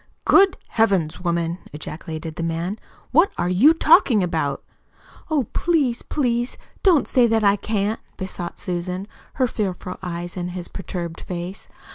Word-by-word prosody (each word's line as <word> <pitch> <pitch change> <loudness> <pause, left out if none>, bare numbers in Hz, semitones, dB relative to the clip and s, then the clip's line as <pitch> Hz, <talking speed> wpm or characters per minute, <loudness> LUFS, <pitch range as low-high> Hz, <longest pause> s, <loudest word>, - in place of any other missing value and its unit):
"Good 390 -1 +6
Heavens, 190 -8 +1
woman!" 170 0 0
ejaculated 155 +1 -6
the - - -5
man. 165 +5 -2 0.3
"What 330 +8 +5
are 175 - 0
you 210 +12 +6
talking 310 - +5
about?" 160 -6 -1 0.7
"Oh, 305 -4 +2
please, 290 -9 +1
please 240 -3 -1 0.2
don't 350 -7 +4
say 245 -2 +4
that 225 -1 +2
I 200 0 +5
can't," 210 +1 -1 0.2
besought 185 -2 -5
Susan, 180 +2 -3 0.3
her 260 - +2
fearful 190 -6 -3
eyes 175 -1 -5
on 175 -1 -2
his 180 0 -6
perturbed 175 -3 -6
face. 180 +2 -6
190 Hz, 140 wpm, -22 LUFS, 175-235 Hz, 0.7 s, Good